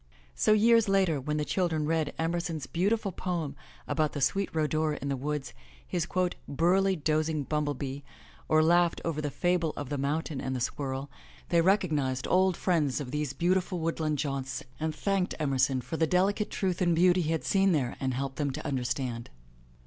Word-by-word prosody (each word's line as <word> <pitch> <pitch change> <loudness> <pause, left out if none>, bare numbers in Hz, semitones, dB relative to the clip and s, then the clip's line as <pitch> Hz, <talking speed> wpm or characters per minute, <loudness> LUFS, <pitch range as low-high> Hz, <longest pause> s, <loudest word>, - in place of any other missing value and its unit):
So, 215 - +2
years 230 0 +5
later, 190 -7 +2
when 150 +3 -2
the 150 - -1
children 165 -4 0
read 155 -1 0
Emerson's 165 -2 -2
beautiful 200 +4 0
poem 170 -6 -3 0.3
about 155 -2 0
the 145 - -3
sweet 195 +8 +1
rhodora 155 -1 0
in 140 - -4
the 140 - 0
woods, 145 +1 -3 0.3
his 175 -2 -2 0.4
'*burly, 185 +6 +2
dozing 155 -1 0
bumblebee," 145 -2 -2 0.5
or 155 0 +5
laughed 175 +1 +3
over 155 -2 -1
the 150 - -2
fable 175 0 0
of 145 -3 -5
the 145 - -2
Mountain 145 +1 -2
and 130 - -2
the - - -2
Squirrel, 135 +2 -3 0.4
they 170 -1 +4
recognized 155 -9 +1
old 185 -1 +3
friends 155 -8 +1
of 130 -4 -5
these 150 -2 -2
beautiful 180 +4 +1
woodland 160 -2 -1
jaunts 135 -2 -3 0.2
and 155 0 -2
thanked 195 +1 0
Emerson 135 -3 +1
for 130 +6 -5
the 160 - +2
delicate 200 +5 +1
truth 185 -3 -1
and 175 -2 +3
beauty 180 +2 +4
he 160 -1 -1
had 160 - -1
seen 195 -1 +3
there 135 -7 0
and 130 -2 -1
helped 135 0 -3
them 145 -2 0
to 135 - -6
understand. 125 -3 -2
155 Hz, 180 wpm, -29 LUFS, 140-175 Hz, 0.5 s, years